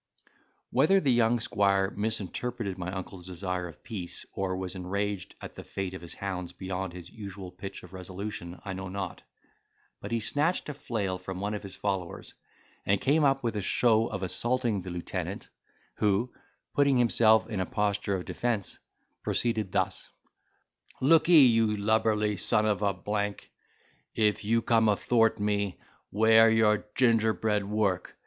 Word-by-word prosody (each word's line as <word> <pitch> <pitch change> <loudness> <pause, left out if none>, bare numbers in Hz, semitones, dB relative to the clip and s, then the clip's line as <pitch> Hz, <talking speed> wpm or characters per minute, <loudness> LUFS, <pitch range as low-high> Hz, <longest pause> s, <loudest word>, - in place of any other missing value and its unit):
Whether 155 +10 +4
the 140 -8 +2
young 120 0 +3
squire 100 -2 +2
misinterpreted 110 0 -2
my 90 -1 -5
uncle's 95 -1 -7
desire 90 0 -3
of 80 -3 -14
peace, 95 -6 -5
or 95 -1 -2
was 95 -1 -4
enraged 100 +1 -3
at - - -9
the - - -9
fate 95 -1 -4
of 95 - -7
his 85 - -9
hounds 90 -3 -4
beyond 95 0 -4
his 90 -1 -10
usual 100 -3 -8
pitch 95 - -8
of 90 0 -13
resolution, 95 -1 -6
I 95 - -3
know 95 0 -6
not; 100 +1 -5 0.8
but - - -8
he 115 - +1
snatched 150 - 0
a - - -3
flail 105 -9 -3
from 95 0 -6
one 100 +2 -2
of 105 - -4
his 95 -2 -9
followers, 95 -4 -3 0.5
and 100 0 +2
came 150 +3 +3
up 135 -1 +3
with 115 -2 -1
a 105 - -1
show 115 +3 +3
of 100 -2 -5
assaulting 120 +2 0
the 90 - -7
lieutenant, 90 -1 -5 0.5
who, 105 +4 +1 0.4
putting 140 -2 +3
himself 115 -2 +4
in 110 -4 -3
a 95 - -1
posture 105 -1 0
of 90 - -4
defence, 115 -5 -2 0.4
proceeded 110 -5 -1
thus: - - -1 0.9
"Lookee, 160 +1 +7
you 115 -3 +3
lubberly 105 0 +1
son 105 +4 +3
of 105 -1 +1
a 100 -1 +2
w—e, 105 +2 -2 0.8
if 105 -2 +2
you 115 +2 +1
come 110 -2 +4
athwart 115 +2 +2
me, 100 -2 -1 0.3
'ware 110 +2 +6
your 110 -1 +3
gingerbread 110 -3 +2
work. 100 -3 -1
105 Hz, 155 wpm, -28 LUFS, 95-115 Hz, 0.9 s, Lookee